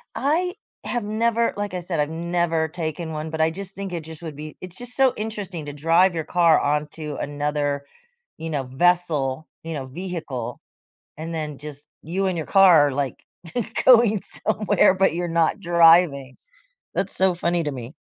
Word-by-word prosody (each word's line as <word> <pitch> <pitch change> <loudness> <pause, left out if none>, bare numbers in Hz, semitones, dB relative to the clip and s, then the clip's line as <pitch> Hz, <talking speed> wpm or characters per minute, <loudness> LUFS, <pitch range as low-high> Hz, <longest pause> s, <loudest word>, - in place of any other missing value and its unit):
I 345 +6 0 0.3
have 240 -2 -2
never, 230 +2 +1
like 205 -1 -3
I 180 - -2
said, 170 -2 -3
I've 145 +1 +1
never 165 -1 0
taken 160 0 -4
one, 155 +1 -4
but 160 0 -3
I 160 - +4
just 195 +3 -7
think 195 -2 -5
it 170 -2 -4
just 160 0 -9
would 160 -3 -7
be 150 +1 -9
it's 185 -1 -9
just 245 0 -4
so 265 -2 +4
interesting 205 -7 -5
to 145 - -6
drive 165 +5 +3
your 165 -2 -2
car 170 0 +4
onto 150 +1 -2
another, 145 0 -2 0.5
you 165 - -5
know, 145 -4 -2
vessel, 150 0 +1 0.2
you 165 0 -5
know, 140 -4 -4
vehicle, 155 -5 -6 0.6
and 165 +2 -6
then, 155 -3 -4
just, 145 0 -10 0.2
you 185 +5 -2
and 185 -2 -1
your 160 - -3
car 180 -7 +6
are, - - -2
like, 135 -1 -3 0.6
going 230 -5 +6
somewhere, 210 -3 +2
but 190 -3 +2
you're 175 0 -2
not 165 +3 +1
driving. 165 -6 +4 0.6
That's 195 - -1
so 190 -1 +3
funny 170 0 0
to 150 - -2
me. 125 +1 -8
165 Hz, 180 wpm, -23 LUFS, 150-185 Hz, 0.6 s, car